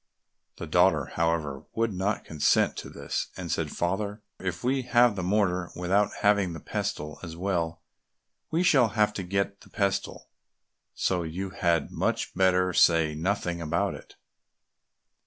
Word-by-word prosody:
The -, -, -5 dB
daughter, -, -, +3 dB
however, 80 Hz, -4 st, -1 dB
would 115 Hz, -2 st, 0 dB
not 95 Hz, +3 st, -1 dB
consent 75 Hz, -2 st, +2 dB
to -, -, -6 dB
this, -, -, -3 dB
and -, -, -5 dB
said, -, -, -1 dB
"Father, 100 Hz, +4 st, -2 dB, 0.2 s
if 90 Hz, -2 st, -4 dB
we 130 Hz, +2 st, +1 dB
have 120 Hz, -2 st, +4 dB
the 95 Hz, -, -3 dB
mortar 90 Hz, -2 st, +1 dB
without 95 Hz, +4 st, +2 dB
having 100 Hz, -4 st, +3 dB
the 80 Hz, -, -7 dB
pestle 75 Hz, +1 st, -4 dB
as 85 Hz, -2 st, -8 dB
well, 85 Hz, -3 st, -2 dB, 0.7 s
we 165 Hz, +3 st, +1 dB
shall 135 Hz, -10 st, +5 dB
have 105 Hz, 0 st, +3 dB
to 100 Hz, -, -4 dB
get 100 Hz, +2 st, -2 dB
the -, -, -17 dB
pestle, 100 Hz, -2 st, -2 dB, 0.7 s
so 90 Hz, -2 st, 0 dB
you 90 Hz, +4 st, -4 dB
had 85 Hz, -5 st, 0 dB
much -, -, -1 dB
better 90 Hz, 0 st, +3 dB
say 80 Hz, -3 st, +4 dB
nothing 85 Hz, +1 st, -1 dB
about 85 Hz, +1 st, 0 dB
it." -, -, -12 dB
90 Hz, 150 wpm, -27 LUFS, 85-100 Hz, 0.7 s, shall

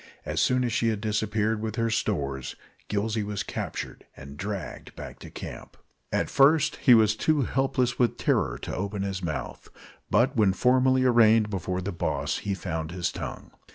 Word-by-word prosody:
As -, -, -1 dB
soon 125 Hz, 0 st, +2 dB
as 120 Hz, -3 st, -1 dB
she 115 Hz, -, +1 dB
had 110 Hz, -2 st, 0 dB
disappeared 110 Hz, 0 st, 0 dB
with 110 Hz, -1 st, -3 dB
her 115 Hz, 0 st, 0 dB
stores, 70 Hz, -, -2 dB, 0.3 s
Gillsey 105 Hz, +2 st, 0 dB
was 100 Hz, -1 st, -3 dB
captured -, -, -5 dB
and 70 Hz, +1 st, -10 dB
dragged 100 Hz, +4 st, -6 dB
back -, -, -9 dB
to -, -, -10 dB
camp. -, -, -9 dB, 0.3 s
At -, -, 0 dB
first 145 Hz, +2 st, +4 dB
he 125 Hz, -4 st, +6 dB
was 110 Hz, -1 st, +4 dB
too 150 Hz, +4 st, +2 dB
helpless 130 Hz, -1 st, 0 dB
with 120 Hz, -1 st, +2 dB
terror -, -, +1 dB
to -, -, -4 dB
open 100 Hz, +1 st, -3 dB
his 95 Hz, -1 st, -3 dB
mouth; 80 Hz, -4 st, -5 dB, 0.4 s
but 130 Hz, +3 st, +3 dB
when 105 Hz, -5 st, +4 dB
formally 130 Hz, +3 st, +3 dB
arraigned 115 Hz, -3 st, +5 dB
before 90 Hz, -1 st, -2 dB
the 100 Hz, +2 st, -3 dB
boss 85 Hz, -, -2 dB
he 100 Hz, -1 st, -2 dB
found 80 Hz, -4 st, -4 dB
his 85 Hz, 0 st, -2 dB
tongue. -, -, -7 dB
105 Hz, 175 wpm, -27 LUFS, 95-120 Hz, 0.4 s, he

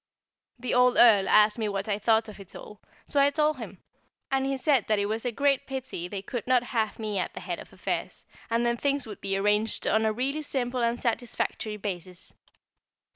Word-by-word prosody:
The 250 Hz, 0 st, -3 dB
old 250 Hz, 0 st, +4 dB
Earl 210 Hz, -5 st, +6 dB
asked 210 Hz, +2 st, +5 dB
me 215 Hz, -2 st, 0 dB
what 195 Hz, 0 st, -3 dB
I 205 Hz, -1 st, -1 dB
thought 220 Hz, +1 st, +2 dB
of 210 Hz, -1 st, -11 dB
it 195 Hz, -1 st, -13 dB
all, 210 Hz, -, -11 dB, 0.2 s
so 285 Hz, -, 0 dB
I 280 Hz, 0 st, +5 dB
told 300 Hz, 0 st, +1 dB
him; 205 Hz, -6 st, -9 dB, 0.5 s
and 270 Hz, 0 st, +1 dB
he 270 Hz, 0 st, -1 dB
said 265 Hz, -4 st, +2 dB
that 215 Hz, -, +2 dB
it 200 Hz, -, +1 dB
was 220 Hz, +3 st, -3 dB
a 245 Hz, -, 0 dB
great 280 Hz, +2 st, +1 dB
pity 260 Hz, -10 st, -5 dB
they 195 Hz, +1 st, -6 dB
could 240 Hz, +2 st, -5 dB
not 250 Hz, -1 st, +3 dB
have 225 Hz, -3 st, -2 dB
me 215 Hz, -3 st, -2 dB
at -, -, -3 dB
the -, -, -5 dB
head -, -, -5 dB
of -, -, -12 dB
affairs, -, -, -4 dB, 0.2 s
and 230 Hz, +1 st, +1 dB
then 235 Hz, 0 st, +1 dB
things 280 Hz, +1 st, 0 dB
would 210 Hz, -3 st, -9 dB
be 195 Hz, 0 st, -1 dB
arranged 210 Hz, +2 st, +1 dB
on 220 Hz, -, +2 dB
a 220 Hz, -, +2 dB
really 270 Hz, +7 st, -1 dB
simple 255 Hz, -4 st, -2 dB
and 235 Hz, +1 st, 0 dB
satisfactory 225 Hz, -2 st, -2 dB
basis. 185 Hz, -3 st, -6 dB
225 Hz, 215 wpm, -27 LUFS, 210-255 Hz, 0.5 s, Earl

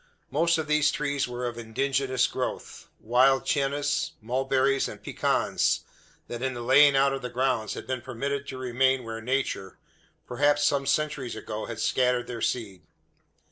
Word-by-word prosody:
Most 165 Hz, +4 st, +2 dB
of 160 Hz, -, -2 dB
these 150 Hz, -1 st, +3 dB
trees 140 Hz, -2 st, -1 dB
were 125 Hz, 0 st, -4 dB
of 120 Hz, -1 st, -4 dB
indigenous 130 Hz, +2 st, 0 dB
growth 130 Hz, -, -5 dB
wild 130 Hz, +4 st, +3 dB
Chinas, 145 Hz, +1 st, 0 dB
mulberries, 135 Hz, +3 st, +1 dB
and -, -, -9 dB
pecans -, -, 0 dB, 0.5 s
that 120 Hz, 0 st, -6 dB
in 130 Hz, -1 st, -2 dB
the 120 Hz, -, -5 dB
laying 140 Hz, +3 st, +6 dB
out 135 Hz, 0 st, +4 dB
of 135 Hz, -, -4 dB
the 125 Hz, -, -5 dB
grounds 125 Hz, -3 st, -1 dB
had -, -, -7 dB
been 130 Hz, -2 st, -3 dB
permitted 140 Hz, +3 st, -4 dB
to 130 Hz, -, -6 dB
remain 130 Hz, +1 st, +1 dB
where 115 Hz, -1 st, -6 dB
Nature, 120 Hz, -6 st, -2 dB, 0.5 s
perhaps 145 Hz, +3 st, +2 dB
some 140 Hz, -1 st, +1 dB
centuries 140 Hz, -3 st, -1 dB
ago, 110 Hz, 0 st, -5 dB
had 115 Hz, -2 st, -6 dB
scattered 125 Hz, +1 st, +1 dB
their 120 Hz, -2 st, -6 dB
seed. 100 Hz, -7 st, -2 dB
130 Hz, 160 wpm, -27 LUFS, 120-140 Hz, 0.5 s, laying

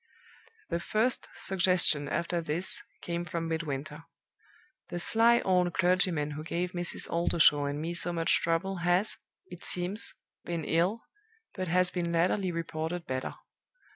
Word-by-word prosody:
"The -, -, 0 dB
first 220 Hz, +7 st, 0 dB
suggestion 180 Hz, -6 st, +3 dB
after 170 Hz, +1 st, -1 dB
this 165 Hz, +4 st, -1 dB, 0.2 s
came 170 Hz, 0 st, -2 dB
from 165 Hz, 0 st, -3 dB
Midwinter. 155 Hz, -1 st, -4 dB, 0.8 s
The 175 Hz, -, -4 dB
sly 230 Hz, +6 st, +4 dB
old 180 Hz, -2 st, +1 dB
clergyman 175 Hz, -4 st, +2 dB
who 150 Hz, +1 st, -6 dB
gave 175 Hz, +2 st, -2 dB
Mrs. 175 Hz, -1 st, -1 dB
Oldershaw 160 Hz, -3 st, +3 dB
and 145 Hz, +1 st, -2 dB
me 165 Hz, +2 st, -3 dB
so 175 Hz, 0 st, +1 dB
much 165 Hz, -1 st, +2 dB
trouble 185 Hz, +3 st, 0 dB
has, 175 Hz, +4 st, +1 dB, 0.3 s
it 180 Hz, -2 st, -11 dB
seems, 185 Hz, +5 st, 0 dB, 0.3 s
been 170 Hz, -2 st, -3 dB
ill, 180 Hz, +8 st, +1 dB, 0.5 s
but 185 Hz, -2 st, -4 dB
has 180 Hz, +1 st, +3 dB
been 170 Hz, -2 st, -2 dB
latterly 180 Hz, +3 st, +1 dB
reported 165 Hz, +1 st, -4 dB
better. 130 Hz, 0 st, -3 dB
175 Hz, 140 wpm, -30 LUFS, 165-180 Hz, 0.8 s, sly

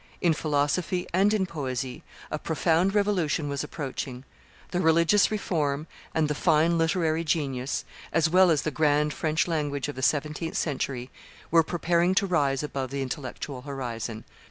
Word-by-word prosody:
In 170 Hz, -3 st, +3 dB
philosophy 155 Hz, +5 st, 0 dB
and 195 Hz, +3 st, +4 dB
in 210 Hz, -3 st, +2 dB
poesy 130 Hz, -6 st, -4 dB, 0.3 s
a 155 Hz, -, -2 dB
profound 170 Hz, +5 st, +1 dB
revolution 185 Hz, -7 st, +1 dB
was 140 Hz, +1 st, -2 dB
approaching; 135 Hz, -4 st, -5 dB, 0.5 s
the 180 Hz, -, 0 dB
religious 170 Hz, +4 st, +4 dB
reform 155 Hz, -8 st, -1 dB, 0.3 s
and 160 Hz, -1 st, +2 dB
the 150 Hz, -, 0 dB
fine 160 Hz, +3 st, +3 dB
literary 165 Hz, -1 st, +1 dB
genius 140 Hz, -5 st, -1 dB, 0.3 s
as 165 Hz, 0 st, +3 dB
well 185 Hz, +2 st, +5 dB
as 155 Hz, -4 st, +2 dB
the 155 Hz, -, -1 dB
grand 150 Hz, 0 st, +2 dB
French 155 Hz, +1 st, 0 dB
language 145 Hz, -4 st, -1 dB
of 145 Hz, -, -5 dB
the 130 Hz, -, -5 dB
seventeenth 150 Hz, +4 st, 0 dB
century 130 Hz, -4 st, -2 dB, 0.4 s
were 165 Hz, 0 st, +7 dB
preparing 170 Hz, +2 st, +1 dB
to 200 Hz, -, +3 dB
rise 145 Hz, -7 st, +1 dB
above 135 Hz, -3 st, -3 dB
the 140 Hz, +1 st, -2 dB
intellectual 130 Hz, 0 st, -5 dB
horizon. 120 Hz, -5 st, -5 dB
155 Hz, 155 wpm, -27 LUFS, 140-170 Hz, 0.5 s, were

